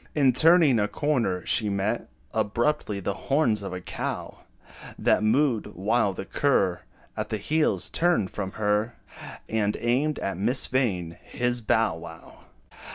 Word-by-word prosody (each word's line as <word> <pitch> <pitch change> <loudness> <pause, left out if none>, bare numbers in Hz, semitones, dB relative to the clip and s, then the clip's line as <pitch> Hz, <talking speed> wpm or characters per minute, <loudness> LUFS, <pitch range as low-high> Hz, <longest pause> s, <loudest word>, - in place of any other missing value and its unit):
In 135 -4 +4
turning 160 -3 +5
a 105 - +1
corner, 115 - -1
she 110 -2 +2
met 100 +1 -2 0.2
Abruptly, 115 -1 0
the 100 +1 -2 0.2
horns 125 -7 +2
of 100 - -5
a 90 - -4
cow - - -5 0.6
That - - +2
mooed, 115 +1 +1
while 105 +2 +1
the 95 - -7
cur, 95 -11 +1 0.3
At - - -4
her 110 - -1
heels, 155 +9 0
turned 170 - +1
from 95 -2 -5
her, 105 +2 0 0.5
And 105 -2 0
aimed 130 +6 0
at 100 -2 -3
Miss 120 +8 +2
Vain 90 -10 -1
his 125 0 -2
"bow 110 -4 +1
wow." 80 0 -12
110 Hz, 145 wpm, -26 LUFS, 100-130 Hz, 0.6 s, turning